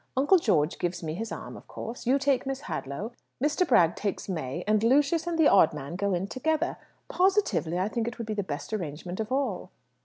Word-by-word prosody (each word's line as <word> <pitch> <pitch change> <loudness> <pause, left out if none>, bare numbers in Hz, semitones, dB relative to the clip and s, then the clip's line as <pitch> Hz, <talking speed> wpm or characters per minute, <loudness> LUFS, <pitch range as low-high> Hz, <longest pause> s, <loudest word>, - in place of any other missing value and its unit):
Uncle 290 +8 +5
George 165 - +1
gives 175 0 -2
me 155 -1 -3
his 220 +6 -5
arm, - - -6
of - - -13
course. 235 +1 -7
You 265 +3 +5
take 275 -1 +1
Miss 270 0 -3
Hadlow, 185 - -5 0.3
Mr. 295 +6 +1
Bragg 175 - +4
takes 205 -2 -3
May, 165 -3 -3
and 215 0 +2
Lucius 290 +7 +3
and 340 -1 -1
the 320 -2 +6
odd 175 -6 +5
man 145 +3 -6
go 200 0 0
in 175 +2 -1
together. 315 - -1 0.3
Positively, 375 - +1
I 185 +2 +1
think 230 +1 -2
it 240 - -4
would 230 - -4
be 215 - -3
the 205 - -1
best 165 +2 -5
arrangement 175 -1 -4
of 220 +1 -3
all." 270 +1 -1
220 Hz, 215 wpm, -28 LUFS, 175-275 Hz, 0.3 s, the